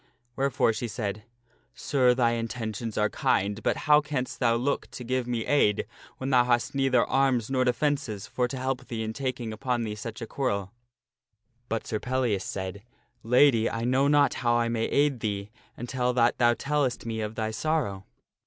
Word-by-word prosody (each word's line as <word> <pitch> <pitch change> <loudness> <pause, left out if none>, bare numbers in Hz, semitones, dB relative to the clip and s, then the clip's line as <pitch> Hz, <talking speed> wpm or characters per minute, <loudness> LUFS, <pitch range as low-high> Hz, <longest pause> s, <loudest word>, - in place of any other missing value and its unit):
Wherefore 135 -4 +2
she 120 - -3
said, 105 -1 -4 0.3
" - - -36 0.2
Sir, 125 -3 +2
thy 120 -2 +3
intentions 115 -1 -4
are 105 - +3
kind, 100 +1 0
but - - 0
how 150 -1 +6
canst 140 -4 -4
thou 115 -2 +3
look 130 +4 -1
to 125 - -8
give 125 0 -1
me 120 -2 -2
aid 105 -8 +2 0.3
when 130 +1 -3
thou 125 -2 +6
hast 120 +2 +1
neither 135 -3 +3
arms 135 -3 +1
nor 130 -1 +2
defences 125 -4 -1
for 125 -1 -1
to 130 - -6
help 130 0 -3
thee 115 -2 -3
in 110 0 -4
tak 130 0 -3
ing 115 -2 -4
upon 120 +1 -1
thee 110 -2 -3
such 110 +1 -7
a 115 - -5
quarrel? 100 -7 -2 0.5
" 120 +3 -46
But 115 -1 -2
Sir 110 - -2
Pellias 125 -4 0
said, 95 +1 -5 0.2
" - - -45
Lady, 120 -1 +4
I 115 0 -3
know 130 +3 +2
not 145 0 +4
how 120 -1 +2
I 120 0 +1
may 115 -1 0
aid 140 -3 +2
thee 105 -1 -3 0.3
until 125 +1 -1
that 120 -1 +2
thou 120 -1 +4
tellest 140 -4 -1
me 110 -1 -3
of 105 +1 -4
thy 110 0 -2
sorrow. 110 -8 -1
120 Hz, 195 wpm, -27 LUFS, 110-130 Hz, 0.5 s, how